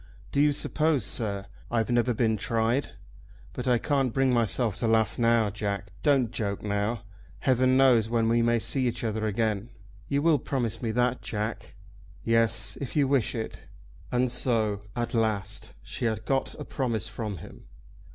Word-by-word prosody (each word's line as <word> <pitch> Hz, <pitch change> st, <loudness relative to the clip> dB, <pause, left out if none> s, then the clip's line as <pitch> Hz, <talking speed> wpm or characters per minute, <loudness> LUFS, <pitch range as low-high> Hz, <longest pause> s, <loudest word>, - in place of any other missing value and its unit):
"Do 140 Hz, -, +2 dB
you 150 Hz, 0 st, +5 dB
suppose, 150 Hz, -3 st, +1 dB
sir, 100 Hz, -3 st, -2 dB, 0.2 s
I've 115 Hz, 0 st, 0 dB
never 120 Hz, +1 st, +3 dB
been 110 Hz, -1 st, +1 dB
tried? 115 Hz, +5 st, 0 dB, 0.6 s
But -, -, -5 dB
I 125 Hz, -1 st, +4 dB
can't 135 Hz, 0 st, +1 dB
bring 135 Hz, +1 st, +2 dB
myself 115 Hz, -2 st, +1 dB
to 115 Hz, -, 0 dB
laugh 110 Hz, -1 st, +2 dB
now, 115 Hz, -3 st, +3 dB
Jack. 100 Hz, -1 st, -3 dB
Don't 135 Hz, -6 st, +3 dB
joke 100 Hz, -5 st, -3 dB
now. 105 Hz, +2 st, -1 dB, 0.4 s
Heaven 130 Hz, -1 st, +3 dB
knows 125 Hz, -5 st, +5 dB
when 115 Hz, -1 st, +2 dB
we 115 Hz, +1 st, +3 dB
may 120 Hz, 0 st, +3 dB
see 130 Hz, +3 st, +1 dB
each 120 Hz, -, -3 dB
other 110 Hz, -1 st, -1 dB
again. 110 Hz, 0 st, -1 dB, 0.4 s
You 140 Hz, 0 st, 0 dB
will 160 Hz, -3 st, +4 dB
promise 120 Hz, -4 st, -2 dB
me 115 Hz, -, -1 dB
that, 125 Hz, +2 st, +1 dB
Jack?" 105 Hz, +1 st, -4 dB, 0.5 s
"Yes; 115 Hz, -2 st, +2 dB
if 135 Hz, -, -5 dB
you 145 Hz, -3 st, +3 dB
wish 135 Hz, -4 st, +1 dB
it." 110 Hz, -1 st, -5 dB, 0.5 s
And 125 Hz, 0 st, +2 dB
so 110 Hz, -5 st, 0 dB
at 120 Hz, +1 st, -2 dB
last 105 Hz, -, -1 dB
she 120 Hz, -, -4 dB
had 110 Hz, -1 st, -1 dB
got 135 Hz, -1 st, 0 dB
a 150 Hz, -, -7 dB
promise 115 Hz, -4 st, -1 dB
from 110 Hz, -3 st, -4 dB
him! 75 Hz, -, -12 dB
115 Hz, 170 wpm, -27 LUFS, 110-125 Hz, 0.6 s, you